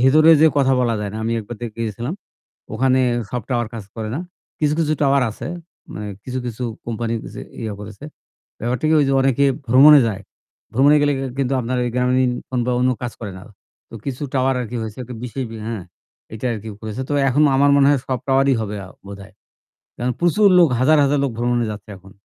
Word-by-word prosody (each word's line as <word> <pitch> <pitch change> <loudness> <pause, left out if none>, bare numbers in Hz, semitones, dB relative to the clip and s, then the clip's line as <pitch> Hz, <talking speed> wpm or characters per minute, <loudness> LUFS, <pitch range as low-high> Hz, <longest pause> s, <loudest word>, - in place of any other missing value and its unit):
ভেতরে 155 +6 +6
যে 160 - +7
কথা 135 -1 +3
বলা 120 -2 +1
যায় 105 -1 -3
না। 110 - -5
আমি 115 - 0
একবার 110 +2 -8
দেখে 115 -1 -6
এসেছিলাম। 120 - -4 0.6
ওখানে 130 +2 +2 0.3
সব 125 -3 -3
টাওয়ার 120 -3 0
কাজ 110 - -6
করে 110 -1 -4
না। 155 - -2 0.4
কিছু, 150 -1 +1
কিছু 155 -1 +1
টাওয়ার 140 -1 +3
আছে, - - -7 0.4
মানে 105 0 -6 0.2
কিছু, 130 0 -4
কিছু 120 +1 -4 0.2
কোম্পানি 115 0 -2 0.2
যে - - -7 0.2
ইয়া 110 -2 -4
করেছে। 105 +6 -10 0.6
ব্যাপারটা 120 +5 -2
কি, 160 - +3
ঐ - - +5
যে - - +1
অনেকে 135 +1 +2 0.2
ভ্রমণে 140 +4 +8
যায়। 100 -1 -5 0.5
ভ্রমণে 140 +5 +5
গেলে 145 0 +3 0.3
কিন্তু 135 -1 0
আপনার 125 +1 -2
এই 120 - -1
গ্রামীণ 125 0 +2 0.2
ফোন 125 -1 -1
বা 125 - +1
অন্য 130 +1 +3
কাজ 120 -1 -3
করে 105 -3 -5
না। - - -12 0.5
তো - - -13
কিছু 135 0 -5
টাওয়ার 130 0 +2
আরকি 120 0 -5
হয়েছে 110 0 -7
একটা 125 +1 -8
বিশেষ 125 +2 -4 0.2
হ্যাঁ, 110 -6 -5 0.5
এইটা 110 +3 -4
আরকি 110 0 -6
করেছে। 110 +3 -5
তো - - -3 0.2
এখন 140 +3 +2
আমার 140 +1 +4
মনে 140 -1 +5
হয় 140 -3 +2
সব 130 -2 -1
টাওয়ারই 135 0 +3
হবে 105 -1 -4
আ - - -13 0.2
বোধহয়। 100 0 -11 0.6
কারণ 125 +1 -1
প্রচুর 200 +4 +4
লোক, 170 -3 +6
হাজার, 155 +4 +5
হাজার 140 +1 +2
লোক 140 - 0
ভ্রমণে 120 0 +1
যাচ্ছে 105 +1 -10
এখন। 95 +1 -17
125 Hz, 205 wpm, -20 LUFS, 110-135 Hz, 0.6 s, ভ্রমণে